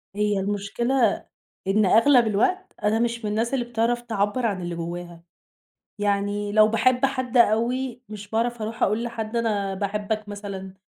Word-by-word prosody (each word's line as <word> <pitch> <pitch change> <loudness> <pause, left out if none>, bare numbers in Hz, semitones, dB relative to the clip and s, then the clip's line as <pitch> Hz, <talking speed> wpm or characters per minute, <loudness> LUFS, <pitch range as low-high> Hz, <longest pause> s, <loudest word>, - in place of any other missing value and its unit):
هي 210 -1 +1
المشكلة 205 +4 0 0.4
إن 205 +1 +3
أغلب 235 +4 +5
الوقت، 365 - 0
أنا 210 +2 +2
مش 235 -1 -1
من 210 - -1
الناس 225 +4 -1
اللي 245 -3 0
بتعرف 240 0 0
تعبّر 225 +1 -1
عن 195 -4 -1
اللي 175 -1 -4
جواها، 170 0 -6 0.8
يعني 205 0 -1
لو 215 0 +6
باحب 245 +4 +3
حد 255 -2 -3
أوي 245 +3 +2
مش 210 -1 -9
باعرف 230 +1 -1
اروح 225 +3 -4
أقول 215 +4 +2
لحد 230 -1 -4
أنا 205 -4 0
باحبك 210 +2 -3
مثلًا، 200 -2 -7
215 Hz, 155 wpm, -24 LUFS, 205-235 Hz, 0.8 s, لو